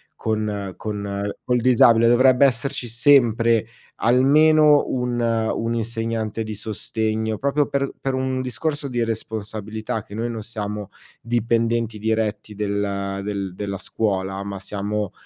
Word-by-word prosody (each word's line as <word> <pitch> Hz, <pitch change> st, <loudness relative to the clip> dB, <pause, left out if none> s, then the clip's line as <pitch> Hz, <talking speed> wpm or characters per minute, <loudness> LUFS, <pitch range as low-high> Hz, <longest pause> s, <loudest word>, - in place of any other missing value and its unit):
con 105 Hz, -3 st, -2 dB
con 100 Hz, -1 st, -3 dB
col 125 Hz, -1 st, +1 dB
disabile. 115 Hz, -1 st, +5 dB
Dovrebbe 130 Hz, +3 st, +5 dB
esserci 130 Hz, 0 st, 0 dB
sempre, 115 Hz, -2 st, +3 dB, 0.4 s
almeno 150 Hz, +5 st, +5 dB
un 125 Hz, -1 st, -1 dB
un 115 Hz, 0 st, 0 dB
insegnante 115 Hz, -1 st, -2 dB
di 110 Hz, 0 st, -5 dB
sostegno. 110 Hz, +1 st, -2 dB
Proprio 140 Hz, +1 st, +1 dB
per 140 Hz, -1 st, -1 dB
per 135 Hz, -, -2 dB
un 130 Hz, 0 st, -1 dB
discorso 145 Hz, +4 st, -3 dB
di 120 Hz, -2 st, -1 dB
responsabilità, 110 Hz, -1 st, -4 dB
che -, -, -14 dB
noi 115 Hz, +3 st, -2 dB
non 115 Hz, -2 st, -5 dB
siamo 105 Hz, -2 st, -5 dB, 0.3 s
dipendenti 115 Hz, -1 st, 0 dB
diretti 110 Hz, -1 st, -2 dB
del 100 Hz, -1 st, -2 dB
del 100 Hz, -3 st, -4 dB
della 100 Hz, -1 st, -4 dB
scuola. 95 Hz, -3 st, -2 dB
Ma 100 Hz, -1 st, -6 dB
siamo 105 Hz, +1 st, -3 dB
110 Hz, 125 wpm, -22 LUFS, 105-120 Hz, 0.4 s, disabile